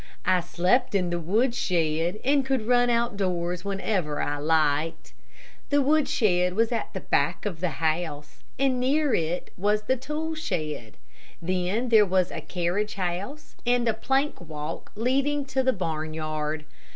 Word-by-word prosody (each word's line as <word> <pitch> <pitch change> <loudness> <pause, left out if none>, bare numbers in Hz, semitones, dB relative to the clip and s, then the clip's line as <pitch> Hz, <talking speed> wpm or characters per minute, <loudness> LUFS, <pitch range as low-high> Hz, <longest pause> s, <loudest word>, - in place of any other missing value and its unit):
I 185 - +4
slept 180 +7 +1
in 180 -3 +1
the 175 - 0
woodshed, 175 -4 +1
and 280 +1 +4
could 265 -4 0
run 245 +1 +4
outdoors 185 -7 0
whenever 195 -6 -1
I 145 - -1
liked. 155 +1 +1 0.6
The 290 - +4
woodshed 220 -11 +2
was 230 +2 +2
at 230 - -2
the - - -4
back - - 0
of 185 -6 -3
the 180 0 0
house, 155 -2 -2 0.2
and 265 -1 +2
near 280 +2 +2
it 165 +2 -1
was 210 +3 +1
the 260 - +1
tool 300 +5 -3
shed. 155 - -4 0.4
Then 185 +7 -1
there 220 -2 +7
was 185 -2 +1
a - - -5
carriage 180 +4 -1
house, 195 +10 -4
and 245 -1 +2
a 225 - +3
plank 270 +4 0
walk 155 -1 -6
leading 275 +5 +1
to 265 -1 0
the 260 0 +3
barnyard. 155 -4 -3
195 Hz, 150 wpm, -26 LUFS, 165-250 Hz, 0.6 s, there